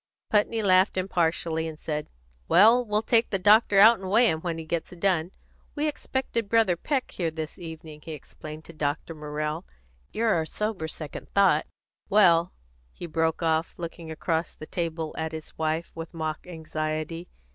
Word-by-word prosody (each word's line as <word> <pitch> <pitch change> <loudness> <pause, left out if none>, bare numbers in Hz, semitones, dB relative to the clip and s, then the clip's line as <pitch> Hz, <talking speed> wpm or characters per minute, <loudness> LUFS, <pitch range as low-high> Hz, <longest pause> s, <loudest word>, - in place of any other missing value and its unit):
Putney 215 +1 +2
laughed 185 0 +4
impartially, 165 -3 0
and 160 -1 -8
said: 150 -1 -3 0.4
"Well, 225 +7 +6
we'll 210 -1 0
take 230 0 +3
the 195 - 0
doctor 205 +1 +5
out 225 +2 +8
and 190 -1 -6
weigh 230 +4 +5
him 160 0 -3
when 170 -2 -3
he 160 - -6
gets 165 +1 -2
done. 175 -2 0 0.5
We 300 0 0
expected 260 -6 -2
Brother 225 -5 +4
Peck 270 - -2
here 170 -3 -1
this 160 +1 -6
evening," 160 -2 -9
he 160 - -7
explained 155 +1 -10
to 170 - -12
Dr. 150 +2 -2
Morrell. 150 +1 -4 0.5
"You're 225 -1 +1
our 160 -2 0
sober 210 -6 -3
second 155 -1 -7
thought 190 -6 +4 0.4
Well," 175 -4 +5 0.4
he - - -8
broke 160 0 0
off, 160 +1 +1
looking 170 -1 -7
across 160 +1 -2
the 155 - -9
table 165 -2 -3
at 160 0 -3
his 160 -1 -8
wife 160 +1 -1
with 165 +1 -8
mock 155 +1 -4
anxiety. 160 0 -4
165 Hz, 170 wpm, -26 LUFS, 160-195 Hz, 0.5 s, out